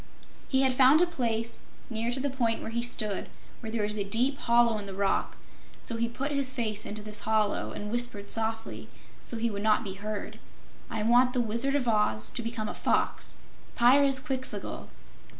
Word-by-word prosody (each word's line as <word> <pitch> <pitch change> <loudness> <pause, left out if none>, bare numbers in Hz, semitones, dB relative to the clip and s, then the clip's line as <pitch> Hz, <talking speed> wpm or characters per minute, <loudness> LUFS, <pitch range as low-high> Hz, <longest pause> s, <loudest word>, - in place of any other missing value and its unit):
He 265 -1 +3
had 260 -1 +3
found 265 +4 +6
a 355 - +5
place, 230 -9 -2 0.3
near 230 0 -3
to 255 - -2
the 280 +1 -1
point 235 -4 0
where - - -5
he 235 +1 -1
stood, 215 -4 -2 0.3
where 220 -2 -7
there 225 -2 -1
was 210 +1 -2
a - - +1
deep 245 +8 +2
hollow 235 -2 +3
in 200 - -8
the 195 - -7
rock, 195 0 -1 0.4
so 230 - -5
he 230 0 -1
put 275 +5 -4
his 280 -2 +2
face 215 -5 -2
into 210 +1 -6
this 210 0 +1
hollow 215 -1 0
and 210 0 -6
whispered 240 -4 0
softly, 225 0 0 0.3
so 235 - 0
he 230 0 -1
would 200 -1 -4
not 215 0 +2
be 195 - -5
heard: 205 +1 -6 0.5
"I 220 -2 -3
want 245 +3 +4
the 250 - 0
Wizard 235 +5 0
of 265 -4 0
Oz 210 - +1
to 240 - -3
become 230 -2 -4
a - - -4
fox - - 0 0.4
Pyrzqxgl!" 265 +1 +2
230 Hz, 190 wpm, -28 LUFS, 215-255 Hz, 0.5 s, found